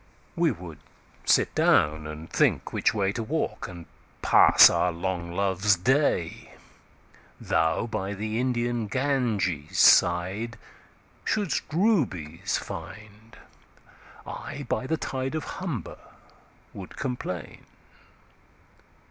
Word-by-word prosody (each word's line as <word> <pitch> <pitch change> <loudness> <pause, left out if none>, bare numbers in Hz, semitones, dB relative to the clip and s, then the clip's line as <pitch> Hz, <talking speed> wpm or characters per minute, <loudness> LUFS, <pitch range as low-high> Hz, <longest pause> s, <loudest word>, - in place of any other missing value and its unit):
We 170 -1 +2
would 85 - -7 0.5
sit - - +3
down, 75 +1 +2
and 75 +1 -8
think - - +1
which - - +2
wayTo 100 +1 -1
walk, 155 +8 -3
and 85 -3 -10 0.4
pass - - +8
our 90 - +1
long 85 0 -4
Loves 95 +2 +2
Day.Thou 110 - 0 1.4
by 100 -3 -4
the 110 +3 -3
Indian 120 -2 -1
Ganges 110 - -1
sideShould'st 110 - +1
Rubies 100 - 0
find: 110 +1 -10 0.9
I 140 - -7
by 130 - -2
the 160 - 0
TideOf 135 +2 -3
Humber 170 - -6 0.7
would 95 -2 -10
complain. 125 -9 -5
105 Hz, 90 wpm, -26 LUFS, 90-130 Hz, 1.4 s, pass